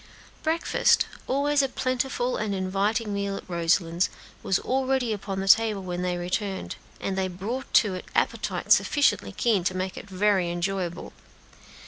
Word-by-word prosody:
Breakfast 325 +1 +2 0.2
always 285 +2 +2
a 270 - 0
plentiful 255 -1 -1
and 210 -2 -2
inviting 200 +3 0
meal 200 0 -2
at - - -10
Roselands 170 0 +1 0.3
was 190 - +1
already 260 -2 0
upon 195 -2 -4
the 195 - -4
table 210 0 +4
when 180 -1 -4
they 180 -1 -1
returned, 190 +2 -3 0.2
and 195 - -2
they 190 0 0
brought 200 +9 -5
to 210 -4 +5
it 185 - -6
appetites - - +2
sufficiently 210 -10 +1
keen 205 -2 +1
to 185 +1 -1
make 185 0 -3
it 200 - -9
very 190 -2 +2
enjoyable. 175 0 -3
195 Hz, 150 wpm, -26 LUFS, 185-235 Hz, 0.3 s, to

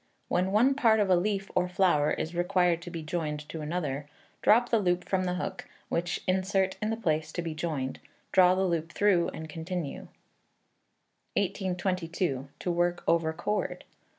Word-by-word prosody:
When 185 +2 +1
one 240 +7 +4
part 225 -5 +4
of 200 -2 +2
a - - +7
leaf 195 +2 -1
or 180 0 +1
flower 180 -6 +3
is 160 +2 -2
required 175 -1 +2
to 175 - -7
be 165 -2 -6
joined 150 -2 -3
to 160 - -5
another, 150 -3 -3 0.3
drop 240 +3 +5
the 230 - +3
loop 180 -3 +1
from 185 -1 +1
the 180 0 -1
hook, 190 +1 -4 0.2
which 170 +1 -1
insert 190 +1 +1
in 215 - 0
the 225 - -1
place 155 -8 0
to 175 - -2
be 165 -2 -3
joined; 155 -5 -3 0.3
draw 185 -1 +6
the 190 +1 +1
loop 165 -2 -1
through 195 -5 +3
and 160 0 -6
continue. 165 -1 -5 1.3
1822. 180 -6 -1
To 180 - -2
Work 175 0 0
over 165 -1 +3
Cord. 175 +6 -2
180 Hz, 170 wpm, -29 LUFS, 165-190 Hz, 1.3 s, a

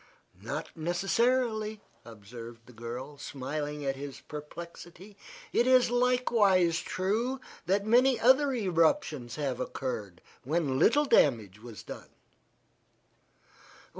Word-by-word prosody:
"Not - - -5
necessarily," 215 +6 0 0.3
observed 115 +1 -11
the 125 - -16
girl, 120 +5 -7
smiling 145 +1 -5
at 135 0 0
his 140 0 -8
perplexity. 170 +5 -10 0.4
"It 240 - +3
is 255 -2 +5
likewise 225 -9 +3
true 225 +8 -1 0.3
that 200 +2 +1
many 245 +3 +4
other 265 +4 +5
eruptions 165 - 0
have 140 -5 -2
occurred, 110 -9 -4 0.2
when 140 -2 0
little 290 - +4
damage 110 - +2
was 115 -3 -10
done." - - -10
165 Hz, 105 wpm, -29 LUFS, -, 0.4 s, is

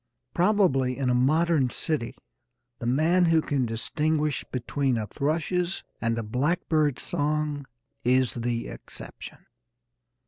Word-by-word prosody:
Probably 175 -10 +2
in 130 -2 +1
a - - +3
modern 150 +2 +3
city 145 -3 -1 0.6
the 120 - -3
man 160 +8 +3
who 165 -1 +4
can 140 -5 0
distinguish 150 +6 0
between 130 +1 -1
a 110 - -2
thrush's 165 - -1 0.2
and 115 0 0
a 115 - -2
blackbird's 150 +4 0
song 150 -1 -1 0.4
is 125 0 +3
the 120 -1 -2
exception. - - -9
145 Hz, 115 wpm, -26 LUFS, 125-160 Hz, 0.6 s, who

